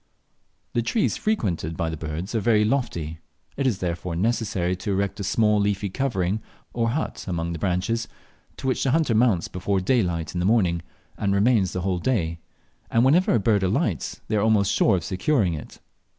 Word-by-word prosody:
The 120 - +2
trees 210 - +1
frequented 90 - -1
by 85 -2 -1
the - - -3
birds 80 +6 -5
are 115 - +1
very 105 0 +3
lofty; 85 - -2 0.4
it 135 -1 0
is 115 -7 +1
therefore 85 -1 -3
necessary 100 -3 0
to 95 - -5
erect 100 +1 -1
a - - -2
small 105 +2 +2
leafy 100 0 0
covering 105 -5 -1 0.3
or 115 -1 +1
hut 145 +7 -3
among 85 -2 -2
the 85 - -5
branches, 95 +6 -1 0.5
to - - -8
which 130 -1 +1
the 135 - +1
hunter 150 -3 +2
mounts 110 -6 +3
before 95 +2 -1
daylight 90 - 0
in 90 - -2
the - - 0
morning 90 -7 +2 0.4
and 100 -1 +1
remains 100 -3 +3
the 90 - -2
whole 90 -1 -1
day, 85 -8 0 0.5
and 115 +2 +3
whenever 165 +5 +4
a - - +3
bird 105 0 +2
alights 95 - -1
they - - -1
are - - +2
almost 105 -2 +3
sure 105 - +3
of 90 - -2
securing 95 - +1
it. 75 - -8
100 Hz, 190 wpm, -24 LUFS, 90-115 Hz, 0.5 s, whenever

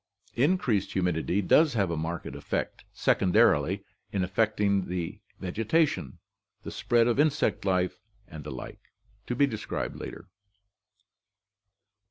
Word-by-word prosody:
Increased 125 - +1
humidity 90 +1 0
does 150 - +4
have 100 -5 +1
a - - -1
marked 80 +2 -3
effect - - -4
second 90 0 +1
arily 95 -3 +4 0.3
in 95 -2 0
affecting 100 0 +1
the 90 +3 -4 0.2
vegetation, 105 - 0 0.5
the - - -6
spread 120 -1 +2
of 120 +2 +1
insect 150 -7 +2
life, 90 -1 +1 0.3
and 80 -3 -9
the 75 - -7
like, 65 -3 -8 0.5
to 125 - -1
be 140 - +4
described 105 - -4
below. - - -7
100 Hz, 125 wpm, -28 LUFS, 90-115 Hz, 0.5 s, does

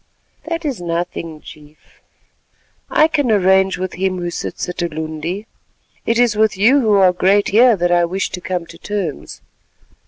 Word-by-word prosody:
"That 330 0 -4
is 265 -10 -3
nothing, 170 -2 -4
Chief; 150 0 -16 0.9
I 310 - +4
can 290 -5 0
arrange 190 -1 +3
with 185 0 -4
him 185 0 -1
who 175 -1 -4
'sits - - -5
at 180 - -6
Ulundi.' 160 +4 -4 0.6
It 230 - +2
is 240 -2 +3
with 215 -2 +1
you 240 +8 +4
who 220 -5 +2
are 190 -2 +5
great 195 +3 +2
here 235 +3 +5
that 175 -2 0
I 175 0 +3
wish 190 +3 -3
to 180 - -6
come 180 -1 -3
to 170 0 -14
terms. 195 -8 -5
185 Hz, 165 wpm, -18 LUFS, 175-215 Hz, 0.9 s, are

